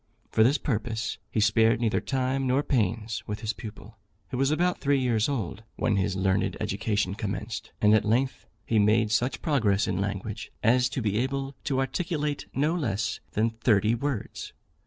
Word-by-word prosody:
For -, -, +3 dB
this 135 Hz, +6 st, +4 dB
purpose 115 Hz, -3 st, -2 dB
he -, -, -1 dB
spared 110 Hz, +1 st, +4 dB
neither 115 Hz, -2 st, +1 dB
time 130 Hz, 0 st, -1 dB
nor 130 Hz, +3 st, +2 dB
pains 110 Hz, -3 st, 0 dB
with 105 Hz, +1 st, -4 dB
his 110 Hz, -1 st, -1 dB
pupil, 110 Hz, -1 st, -10 dB, 0.3 s
who 125 Hz, -, -3 dB
was 135 Hz, 0 st, +3 dB
about 175 Hz, +4 st, +1 dB
three 140 Hz, 0 st, +2 dB
years 120 Hz, -2 st, +1 dB
old 115 Hz, -7 st, -3 dB
when 110 Hz, -, +1 dB
his 95 Hz, 0 st, 0 dB
learned 95 Hz, 0 st, +1 dB
education 100 Hz, -2 st, -1 dB
commenced; 105 Hz, +2 st, -4 dB
and 105 Hz, 0 st, +6 dB
at 110 Hz, -, +4 dB
length 125 Hz, +5 st, 0 dB, 0.2 s
he 110 Hz, -, +2 dB
made 105 Hz, +1 st, +3 dB
such 120 Hz, +4 st, 0 dB
progress 110 Hz, -9 st, +2 dB
in 95 Hz, -, -1 dB
language, 100 Hz, +1 st, -4 dB
as 125 Hz, +3 st, +4 dB
to 130 Hz, -, -3 dB
be 105 Hz, 0 st, +1 dB
able 135 Hz, +2 st, -2 dB
to 135 Hz, -2 st, 0 dB
articulate 150 Hz, +1 st, -2 dB
no 150 Hz, +4 st, +2 dB
less 110 Hz, -, -1 dB
than 110 Hz, +2 st, +1 dB
thirty 110 Hz, -1 st, +2 dB
words. 125 Hz, -2 st, -3 dB
115 Hz, 175 wpm, -27 LUFS, 105-135 Hz, 0.3 s, and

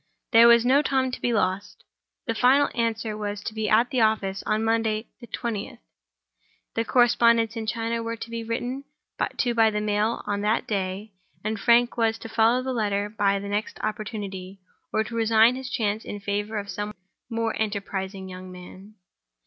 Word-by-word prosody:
There 230 Hz, -1 st, +8 dB
was 235 Hz, 0 st, +6 dB
no 270 Hz, +3 st, +5 dB
time 265 Hz, -3 st, 0 dB
to -, -, -6 dB
be 240 Hz, -, +1 dB
lost. 200 Hz, -2 st, -1 dB, 0.4 s
The 230 Hz, -, -1 dB
final 260 Hz, +5 st, +4 dB
answer 225 Hz, -2 st, -1 dB
was 205 Hz, -1 st, -4 dB
to -, -, -4 dB
be 215 Hz, -1 st, -2 dB
at 230 Hz, +3 st, +3 dB
the 255 Hz, -, +1 dB
office 200 Hz, -3 st, +1 dB
on 215 Hz, +1 st, +1 dB
"Monday, 225 Hz, -1 st, 0 dB
the 240 Hz, -, -11 dB
twentieth": 230 Hz, -5 st, -4 dB, 1.0 s
the 230 Hz, -, 0 dB
correspondents 230 Hz, -1 st, +3 dB
in 225 Hz, -1 st, -4 dB
China 230 Hz, +1 st, -1 dB
were 230 Hz, 0 st, -3 dB
to 230 Hz, 0 st, -8 dB
be 230 Hz, 0 st, -4 dB
written 245 Hz, +4 st, -3 dB, 0.5 s
to 240 Hz, -2 st, +1 dB
by 225 Hz, -1 st, +5 dB
the 210 Hz, -1 st, -2 dB
mail 210 Hz, +2 st, 0 dB
on 205 Hz, -1 st, -2 dB
that 210 Hz, +2 st, +1 dB
day; 195 Hz, +1 st, -3 dB, 0.3 s
and 215 Hz, 0 st, -2 dB
Frank 240 Hz, +3 st, +4 dB
was 225 Hz, -1 st, +2 dB
to 225 Hz, -, -9 dB
follow 230 Hz, +3 st, +3 dB
the 260 Hz, 0 st, -2 dB
letter 205 Hz, -3 st, 0 dB
by 205 Hz, -2 st, +1 dB
the 200 Hz, +1 st, -6 dB
next 205 Hz, +2 st, -3 dB
opportunity, 200 Hz, -3 st, -5 dB, 0.3 s
or 220 Hz, -, +1 dB
to 225 Hz, -, -9 dB
resign 225 Hz, +1 st, +4 dB
his 260 Hz, -1 st, -6 dB
chance 215 Hz, -4 st, -1 dB
in 205 Hz, -, -6 dB
favor 205 Hz, +2 st, -2 dB
of 200 Hz, -1 st, -4 dB
some 205 Hz, +1 st, -5 dB, 0.3 s
more 230 Hz, -1 st, -1 dB
enterprising 195 Hz, -2 st, -3 dB
young 185 Hz, 0 st, -9 dB
man. 185 Hz, +3 st, -12 dB
220 Hz, 180 wpm, -25 LUFS, 205-230 Hz, 1.0 s, There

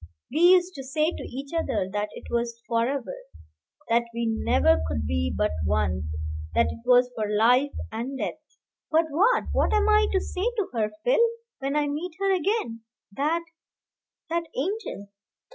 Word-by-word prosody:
We 300 Hz, -, -1 dB
used 360 Hz, +1 st, +6 dB
to 270 Hz, -, -7 dB
say 305 Hz, +5 st, +1 dB
to -, -, -7 dB
each 275 Hz, +4 st, -7 dB
other 325 Hz, -, 0 dB
that 210 Hz, 0 st, -1 dB
it -, -, -10 dB
was 235 Hz, -1 st, -1 dB
forever, 240 Hz, -, 0 dB, 0.7 s
that 235 Hz, +1 st, +3 dB
we 235 Hz, 0 st, -1 dB
never 85 Hz, -, +3 dB
could 75 Hz, -1 st, -2 dB
be 85 Hz, +2 st, 0 dB
but 105 Hz, +5 st, 0 dB
one, 80 Hz, +1 st, 0 dB, 0.5 s
that 75 Hz, -, +3 dB
it -, -, -8 dB
was 250 Hz, 0 st, +5 dB
for 215 Hz, -3 st, -2 dB
life 245 Hz, +6 st, +4 dB, 0.2 s
and 245 Hz, +5 st, -4 dB
death. -, -, -3 dB, 0.5 s
But 325 Hz, +1 st, +3 dB
what 410 Hz, +12 st, +3 dB
what -, -, +2 dB
am 420 Hz, 0 st, +3 dB
I 425 Hz, 0 st, +5 dB
to 385 Hz, -, +3 dB
say 380 Hz, +6 st, -2 dB
to 415 Hz, -, 0 dB
her, 220 Hz, -3 st, 0 dB, 0.2 s
Phil, -, -, +4 dB, 0.4 s
when 275 Hz, +1 st, -2 dB
I 300 Hz, -1 st, +2 dB
meet 310 Hz, +5 st, -3 dB
her 390 Hz, -1 st, +2 dB
again, 365 Hz, -, -1 dB, 0.3 s
that 305 Hz, +9 st, 0 dB, 0.9 s
that 335 Hz, 0 st, -1 dB
angel? 335 Hz, -, -3 dB
265 Hz, 165 wpm, -26 LUFS, 215-340 Hz, 0.9 s, used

